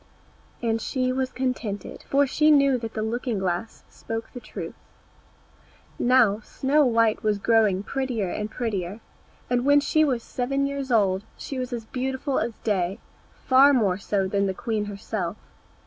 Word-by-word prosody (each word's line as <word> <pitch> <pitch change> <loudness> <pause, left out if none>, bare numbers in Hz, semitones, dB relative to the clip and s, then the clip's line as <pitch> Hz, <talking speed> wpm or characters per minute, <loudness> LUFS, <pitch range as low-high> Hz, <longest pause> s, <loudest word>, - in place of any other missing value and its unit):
And 225 -1 0
she 255 +1 -1
was 260 0 -1
contented, 250 -6 -3
for 280 +1 +4
she 305 +3 +2
knew 275 -4 +5
that 225 -1 -6
the 215 - -1
looking 235 0 -2
glass 190 +3 -3
spoke 225 0 -6
the 245 - -6
truth. - - -7 1.3
Now, 240 -5 +4
Snow 275 +6 +1
white 230 -2 +2
was 210 -1 +1
growing 210 -3 +3
prettier 250 -5 -2
and 210 +4 -3
prettier, 205 -4 -3 0.5
and 245 0 +1
when 285 +1 +5
she 310 +2 +2
was 255 -6 0
seven 275 +2 -1
years 275 -1 -3
old 195 -4 +3
she 270 - -5
was 255 0 -4
as 235 -2 -4
beautiful 260 +3 -2
as 235 - -2
day, 190 -3 0 0.5
far 270 +2 +6
more 200 -7 +2
so 195 -1 0
than 200 +1 +1
the 190 - -2
queen 215 -1 -2
herself. 200 -2 -4
230 Hz, 160 wpm, -25 LUFS, 205-260 Hz, 1.3 s, far